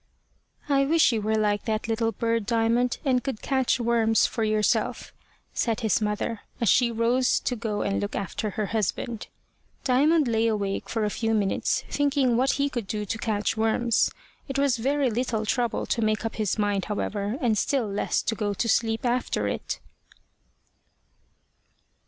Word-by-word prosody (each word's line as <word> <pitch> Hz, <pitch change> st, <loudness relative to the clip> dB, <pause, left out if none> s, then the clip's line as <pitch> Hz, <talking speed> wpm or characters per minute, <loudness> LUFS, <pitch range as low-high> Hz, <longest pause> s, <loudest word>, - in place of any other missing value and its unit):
"I 275 Hz, -1 st, +3 dB
wish 315 Hz, 0 st, +4 dB
you 225 Hz, -2 st, -1 dB
were 220 Hz, +1 st, 0 dB
like 205 Hz, -1 st, 0 dB
that 220 Hz, 0 st, -1 dB
little 225 Hz, 0 st, 0 dB
bird, 230 Hz, -2 st, -1 dB
Diamond, 235 Hz, +1 st, +1 dB
and 255 Hz, -2 st, +2 dB
could 265 Hz, -6 st, -4 dB
catch 265 Hz, -2 st, +1 dB
worms 230 Hz, -2 st, +3 dB
for 225 Hz, -, -2 dB
yourself," 215 Hz, -1 st, 0 dB, 0.4 s
said 230 Hz, -1 st, 0 dB
his 220 Hz, -1 st, +1 dB
mother, 210 Hz, +1 st, -2 dB, 0.2 s
as 230 Hz, -, +2 dB
she 245 Hz, -2 st, +4 dB
rose 235 Hz, +3 st, +2 dB
to 250 Hz, -, -1 dB
go 215 Hz, -2 st, -2 dB
and 200 Hz, -, -1 dB
look 205 Hz, -, -3 dB
after 200 Hz, +2 st, -3 dB
her 210 Hz, +1 st, -2 dB
husband. 220 Hz, +2 st, -2 dB, 0.6 s
Diamond 290 Hz, +4 st, +3 dB
lay 225 Hz, -1 st, +2 dB
awake 200 Hz, -3 st, -2 dB
for 225 Hz, -2 st, 0 dB
a 210 Hz, -, -1 dB
few 225 Hz, +1 st, 0 dB
minutes, 200 Hz, -2 st, 0 dB
thinking 280 Hz, -4 st, +1 dB
what 260 Hz, +3 st, +2 dB
he 280 Hz, +1 st, +1 dB
could 240 Hz, -7 st, -4 dB
do 210 Hz, 0 st, -3 dB
to 215 Hz, -, -3 dB
catch 210 Hz, -1 st, -1 dB
worms. 225 Hz, +1 st, +2 dB, 0.4 s
It 270 Hz, -1 st, -3 dB
was 275 Hz, -3 st, +2 dB
very 270 Hz, +2 st, +1 dB
little 225 Hz, -1 st, -1 dB
trouble 240 Hz, +2 st, 0 dB
to 230 Hz, -, -1 dB
make 215 Hz, 0 st, 0 dB
up 225 Hz, -, -4 dB
his 215 Hz, -2 st, 0 dB
mind, 205 Hz, -3 st, 0 dB
however, 205 Hz, +1 st, -2 dB
and 235 Hz, -6 st, +2 dB
still 245 Hz, +2 st, 0 dB
less 200 Hz, 0 st, -1 dB
to -, -, 0 dB
go 205 Hz, -2 st, -2 dB
to 230 Hz, -, -1 dB
sleep 225 Hz, +1 st, +1 dB
after 245 Hz, +1 st, 0 dB
it. -, -, -3 dB
225 Hz, 170 wpm, -26 LUFS, 215-245 Hz, 0.6 s, wish